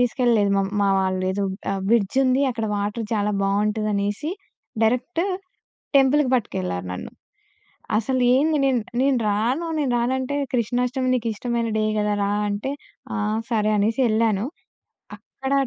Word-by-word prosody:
తీసుకెళ్ళలేదు 240 Hz, -4 st, +2 dB
మా 195 Hz, -, +3 dB, 0.2 s
మా 200 Hz, -, +3 dB
వాళ్ళు 185 Hz, 0 st, 0 dB
ఏదో 200 Hz, +1 st, -1 dB, 0.3 s
ఆహ్, 195 Hz, -1 st, -2 dB
బ్రిడ్జ్ 225 Hz, -1 st, +2 dB
ఉంది 260 Hz, +2 st, +3 dB
అక్కడ 225 Hz, -2 st, -3 dB
వాటర్ 205 Hz, +3 st, -2 dB
చాలా 210 Hz, -1 st, +1 dB
బావుంటుదనేసి, 210 Hz, -, 0 dB, 0.5 s
డైరెక్ట్ 250 Hz, +7 st, +1 dB, 0.8 s
టెంపుల్‌కి 270 Hz, 0 st, +4 dB
పట్టుకెళ్లారు 90 Hz, -, -2 dB
నన్ను. 90 Hz, -, -6 dB, 0.9 s
అసలు 255 Hz, +4 st, 0 dB
ఏంది 305 Hz, +3 st, +2 dB
నేను 260 Hz, -2 st, +2 dB, 0.2 s
"నేను 270 Hz, -1 st, +3 dB
రాను 235 Hz, +10 st, 0 dB
నేను 280 Hz, -4 st, 0 dB
రానంటే," 260 Hz, +3 st, -1 dB, 0.2 s
"కృష్ణాష్టమి 250 Hz, +2 st, 0 dB
నీకు 235 Hz, -2 st, -2 dB
ఇష్టమైన 235 Hz, +1 st, -2 dB
డే 215 Hz, -, +1 dB, 0.2 s
కదా! 210 Hz, 0 st, +1 dB
రా" 200 Hz, -, 0 dB, 0.2 s
అంటే, 205 Hz, +6 st, -3 dB, 0.4 s
ఆ! -, -, -2 dB, 0.3 s
సరే 215 Hz, -2 st, +2 dB
అనేసి 220 Hz, +4 st, +1 dB
ఎళ్ళాను. 215 Hz, -1 st, +1 dB, 0.7 s
అక్కడ 270 Hz, 0 st, -5 dB
230 Hz, 135 wpm, -23 LUFS, 205-255 Hz, 0.9 s, టెంపుల్‌కి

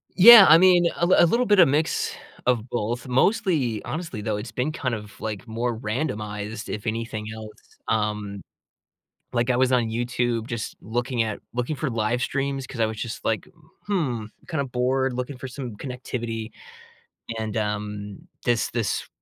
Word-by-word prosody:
Yeah, 220 Hz, +1 st, +11 dB
I 160 Hz, -, +9 dB
mean, 180 Hz, 0 st, +5 dB
a -, -, -7 dB
l 185 Hz, -, +4 dB
a -, -, +7 dB
little 235 Hz, +8 st, +2 dB
bit 205 Hz, -3 st, +4 dB
of 170 Hz, -, +8 dB
mix 150 Hz, +4 st, 0 dB, 0.3 s
of 125 Hz, -1 st, +1 dB
both. 120 Hz, +2 st, -2 dB
Mostly 130 Hz, -, +1 dB
honestly, 160 Hz, -9 st, -5 dB
though, 105 Hz, 0 st, -1 dB
it's 105 Hz, -, -6 dB
been 130 Hz, +5 st, -1 dB
kind 130 Hz, -5 st, -2 dB
of, 105 Hz, -1 st, -10 dB
like, 110 Hz, +1 st, -5 dB
more 115 Hz, +1 st, -2 dB
randomized 110 Hz, -3 st, -4 dB
if 105 Hz, +1 st, -6 dB
anything 115 Hz, -1 st, -3 dB
else, 110 Hz, -1 st, -12 dB
um. 105 Hz, -2 st, -1 dB, 0.9 s
Like, 120 Hz, +2 st, +1 dB
I 125 Hz, -, +3 dB
was 130 Hz, 0 st, +3 dB
on 125 Hz, -2 st, +3 dB
YouTube 120 Hz, 0 st, -1 dB
just 115 Hz, -4 st, -5 dB
looking 120 Hz, +2 st, -1 dB
at 110 Hz, -2 st, -4 dB, 0.2 s
looking 125 Hz, +5 st, -1 dB
for 140 Hz, +1 st, -2 dB
livestreams 130 Hz, +4 st, -1 dB
'cause 125 Hz, -, -9 dB
I 115 Hz, -, +4 dB
was 110 Hz, 0 st, -4 dB
just, 115 Hz, -, -5 dB
like, 110 Hz, -1 st, -1 dB, 0.4 s
"Hmm." 135 Hz, -, -1 dB, 0.2 s
Kinda 140 Hz, -4 st, -1 dB
bored, 130 Hz, +1 st, 0 dB
looking 125 Hz, +2 st, -4 dB
for 130 Hz, -, -7 dB
some 125 Hz, -3 st, -7 dB
connectivity, 120 Hz, -3 st, -5 dB, 0.9 s
and, 110 Hz, 0 st, -4 dB
um, 105 Hz, -1 st, -4 dB, 0.2 s
this 120 Hz, -2 st, +1 dB
this 115 Hz, -3 st, -2 dB
120 Hz, 165 wpm, -24 LUFS, 110-135 Hz, 0.9 s, Yeah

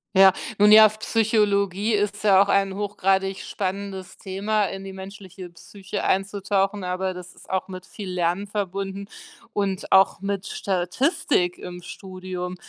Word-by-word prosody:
Ja. 190 Hz, 0 st, +8 dB, 0.3 s
Nun 210 Hz, +1 st, +6 dB
ja, 220 Hz, 0 st, +10 dB
auf 215 Hz, 0 st, 0 dB
Psychologie 210 Hz, -2 st, +1 dB
ist 205 Hz, 0 st, -1 dB
ja 195 Hz, -2 st, +6 dB
auch 200 Hz, -, +3 dB
ein 195 Hz, -1 st, +2 dB
hochgradig 195 Hz, -1 st, 0 dB
spannendes 190 Hz, -1 st, -5 dB
Thema, 205 Hz, +2 st, -1 dB
in 195 Hz, 0 st, -6 dB
die 195 Hz, 0 st, -8 dB
menschliche 190 Hz, -2 st, -10 dB
Psyche 200 Hz, +3 st, -7 dB
einzutauchen, 195 Hz, +1 st, 0 dB
aber 185 Hz, +1 st, -2 dB
das 180 Hz, 0 st, -10 dB
ist -, -, -17 dB
auch 190 Hz, 0 st, -1 dB
mit 185 Hz, -1 st, -9 dB
viel 200 Hz, -4 st, -8 dB
Lernen 180 Hz, +2 st, -1 dB
verbunden 195 Hz, -1 st, -4 dB, 0.5 s
und 195 Hz, -2 st, -2 dB
auch 190 Hz, 0 st, +5 dB
mit 200 Hz, -1 st, -3 dB
Statistik 190 Hz, -, 0 dB
im 180 Hz, 0 st, -8 dB
Studium. 185 Hz, -1 st, -7 dB
195 Hz, 145 wpm, -24 LUFS, 185-205 Hz, 0.5 s, ja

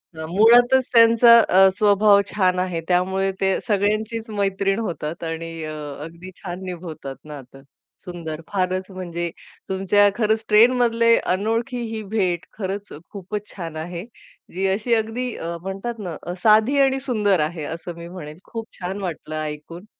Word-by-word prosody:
न 160 Hz, 0 st, -6 dB
मुळातच 240 Hz, +7 st, +5 dB
त्यांचा 230 Hz, 0 st, +7 dB
अ, 190 Hz, +1 st, +6 dB
स्वभाव 205 Hz, 0 st, +4 dB
छान 185 Hz, -3 st, +1 dB
आहे, 180 Hz, -2 st, -1 dB
त्यामुळे 190 Hz, +2 st, +1 dB
ते 195 Hz, 0 st, +2 dB
सगळ्यांचीच 215 Hz, +2 st, -1 dB
मैत्रीण 200 Hz, -1 st, 0 dB
होतात 170 Hz, -6 st, -4 dB
आणि 165 Hz, 0 st, -4 dB, 0.2 s
अ, 155 Hz, -, -5 dB, 0.3 s
अगदी 170 Hz, +3 st, -10 dB
छान 180 Hz, 0 st, -7 dB
निभवतात 165 Hz, -6 st, -7 dB
नातं. 135 Hz, -3 st, -11 dB, 0.4 s
सुंदर, 165 Hz, -4 st, -6 dB
फारच 185 Hz, -1 st, -2 dB
म्हणजे 175 Hz, -2 st, -4 dB, 0.4 s
तुमच्या 195 Hz, +2 st, +3 dB
खरंच 220 Hz, -1 st, +1 dB
ट्रेनमधले 230 Hz, +1 st, +5 dB, 0.2 s
अनोळखी 225 Hz, +6 st, -1 dB
ही 220 Hz, -1 st, -4 dB
भेट 180 Hz, -5 st, 0 dB
खरंच 200 Hz, 0 st, -4 dB, 0.2 s
खूपच 205 Hz, +1 st, -6 dB
छान 165 Hz, -4 st, -6 dB
आहे. 170 Hz, +2 st, -5 dB, 0.5 s
जी 190 Hz, +2 st, -2 dB
अशी 220 Hz, +4 st, -1 dB
अगदी 230 Hz, +2 st, -1 dB
अ, 170 Hz, +1 st, -5 dB
म्हणतात 195 Hz, +5 st, -5 dB
ना 180 Hz, -6 st, -5 dB, 0.3 s
साधी 220 Hz, +5 st, +4 dB
आणि 270 Hz, 0 st, +2 dB
सुंदर 215 Hz, -, +1 dB
आहे 155 Hz, +1 st, -2 dB
असं 170 Hz, +2 st, -6 dB
मी 170 Hz, 0 st, -8 dB
म्हणेल. 160 Hz, -3 st, -9 dB
खूप 225 Hz, -1 st, -7 dB
छान 190 Hz, +3 st, -4 dB
वाटलं 160 Hz, -3 st, -5 dB
ऐकून. 155 Hz, +4 st, -7 dB
195 Hz, 145 wpm, -22 LUFS, 175-220 Hz, 0.5 s, त्यांचा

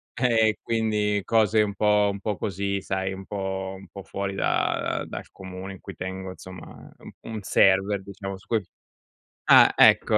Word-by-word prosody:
e 115 Hz, -3 st, +2 dB
quindi 105 Hz, -2 st, 0 dB
cose 110 Hz, 0 st, +3 dB
un 100 Hz, -1 st, -1 dB
po 105 Hz, 0 st, +3 dB
un 100 Hz, -, -7 dB
po' 105 Hz, +1 st, -2 dB
così, 100 Hz, 0 st, -3 dB
sai 95 Hz, 0 st, -2 dB
un 95 Hz, 0 st, -9 dB
po 95 Hz, -1 st, -4 dB
un 95 Hz, -, -14 dB
po' 100 Hz, -, -9 dB
fuori 100 Hz, +1 st, -4 dB
da 95 Hz, -, 0 dB
uhm, -, -, -11 dB
dal -, -, -7 dB
comune, 95 Hz, +1 st, -8 dB
in 95 Hz, -, -12 dB
cui -, -, -9 dB
tengo 95 Hz, 0 st, -6 dB
insomma 95 Hz, 0 st, -12 dB
u -, -, -12 dB, 0.2 s
un 110 Hz, -2 st, -5 dB
server, 95 Hz, +1 st, +3 dB
diciamo 100 Hz, 0 st, -7 dB
su -, -, -22 dB
cui 110 Hz, -4 st, 0 dB, 0.8 s
ah, -, -, +8 dB
ecco, -, -, +5 dB
100 Hz, 175 wpm, -25 LUFS, 95-105 Hz, 0.8 s, ah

